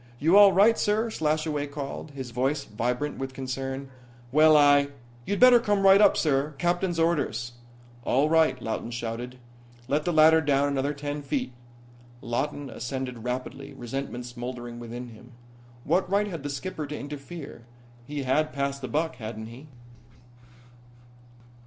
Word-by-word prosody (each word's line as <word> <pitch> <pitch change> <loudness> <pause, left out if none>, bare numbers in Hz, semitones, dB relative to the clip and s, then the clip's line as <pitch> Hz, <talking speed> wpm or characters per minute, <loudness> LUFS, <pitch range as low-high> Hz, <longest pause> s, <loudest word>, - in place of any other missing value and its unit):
"You 160 +8 +3
all 205 -1 +9
right, 205 +5 +4
sir," 220 +2 +1
Slashaway 155 -3 -1
called, 140 +1 -6
his 135 -4 -7
voice 135 +4 0
vibrant 125 +7 -3
with 135 0 -5
concern. 135 +1 -5 0.4
"Well, 155 +2 +6
I 145 -1 +5 0.2
" 120 0 -25
"You'd 200 - -1
better 250 -1 +8
come 205 -3 0
right 195 +1 +7
up, 205 - +5
sir. 145 -1 0
Captain's 175 +1 0
orders." 165 -7 0 0.5
"All 135 +4 +2
right," 160 -4 +3
Lawton 115 0 -4
shouted. 120 +1 -5 0.5
"Let 145 +3 0
the 175 - 0
ladder 160 0 +6
down 145 -1 +2
another 140 +1 -1
ten 145 +1 -4
feet." 135 -3 -3 0.7
Lawton 140 +5 -3
ascended 125 -1 -5
rapidly, 130 +3 -5
resentment 125 0 -5
smouldering 120 -1 -7
within 120 +1 -7
him. 120 +2 -15 0.5
What 175 +6 +1
right 200 +2 +2
had 170 -7 -6
the 145 - -5
skipper 150 +1 -5
to 150 - -5
interfere? 145 -2 -8 0.4
He 145 -1 -4
had 155 +4 +1
passed 140 0 -2
the 130 - -4
buck, 160 +4 -1
hadn't 110 -1 -7
he? 130 +6 -12
140 Hz, 150 wpm, -26 LUFS, 125-155 Hz, 0.7 s, all